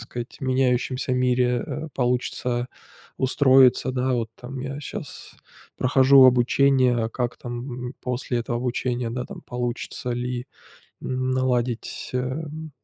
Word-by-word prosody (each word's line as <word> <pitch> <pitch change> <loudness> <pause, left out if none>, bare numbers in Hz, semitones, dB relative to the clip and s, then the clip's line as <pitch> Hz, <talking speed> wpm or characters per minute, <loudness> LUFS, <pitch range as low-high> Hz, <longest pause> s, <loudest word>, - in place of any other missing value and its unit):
сказать 120 +1 -7
меняющемся 130 0 0
мире, 125 -1 +2
э, 160 +1 -5
получится 125 -1 -1 0.5
устроиться. 130 -1 +4
Да 130 0 0
вот 115 -2 -1
там 130 +2 -8
я 135 +3 -5
щас - - -8 0.4
прохожу 130 +1 +6
обучение, 125 -1 +4
как 120 0 -2
там, 125 0 -6
м, 125 - -7
после 125 -1 -2
этого 120 0 -2
обучения, 125 -1 -2
да, 125 +1 -3
там - - -9
получится 125 +1 -4
ли 125 +1 -3 0.6
наладить, 130 -2 -1
эм, 150 +5 -4
125 Hz, 115 wpm, -24 LUFS, 120-130 Hz, 0.6 s, прохожу